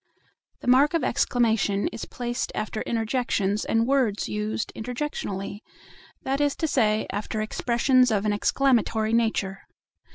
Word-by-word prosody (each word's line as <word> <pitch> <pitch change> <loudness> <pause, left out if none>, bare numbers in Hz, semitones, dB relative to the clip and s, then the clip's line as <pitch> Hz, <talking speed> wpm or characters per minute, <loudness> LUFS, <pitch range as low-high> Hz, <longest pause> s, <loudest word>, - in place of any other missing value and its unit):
The - - -9
mark 275 +6 +5
of 330 - +1
exclamation 220 -5 +1
is 225 - -7
placed 240 0 -4
after 215 0 -3
interjections 225 -3 -1
and 225 0 +1
words 255 -6 +1
used 210 +1 -3
interjectionally; 220 -5 -4 0.6
that 270 +2 -1
is 290 -1 +1
to 320 - -1
say, 220 -7 +2
after 210 +2 -3
expressions 245 +3 +2
of 210 -2 0
an 210 - +2
exclamatory 225 -1 +1
nature. 220 -4 0
225 Hz, 130 wpm, -25 LUFS, 210-255 Hz, 0.6 s, mark